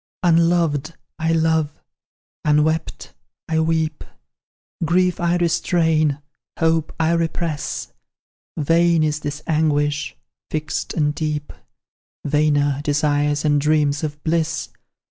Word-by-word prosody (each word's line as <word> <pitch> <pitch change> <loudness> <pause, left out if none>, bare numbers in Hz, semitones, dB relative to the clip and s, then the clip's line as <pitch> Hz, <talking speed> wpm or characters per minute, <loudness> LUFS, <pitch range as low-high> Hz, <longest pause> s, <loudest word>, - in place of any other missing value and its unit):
"Unloved 165 -3 +2 0.2
I 160 +1 +1
love; 160 -2 +1 0.6
unwept 155 +2 0 0.3
I 160 0 +1
weep; 160 -1 0 0.8
Grief 180 +2 +2
I 175 0 +1
restrain 160 -4 +1 0.3
hope 160 -1 +1
I 160 0 +2
repress: 165 -2 -2 0.6
Vain 165 +1 +3
is 150 -1 0
this 150 0 -5
anguish 145 -2 0 0.3
fixed 155 -1 -3
and 150 -2 +1
deep; 150 -1 -3 0.7
Vainer, 145 -1 +2
desires 145 0 +1
and 145 -1 +3
dreams 150 0 +1
of 150 -1 -3
bliss. 160 -1 -1
155 Hz, 100 wpm, -21 LUFS, 150-165 Hz, 0.8 s, Vain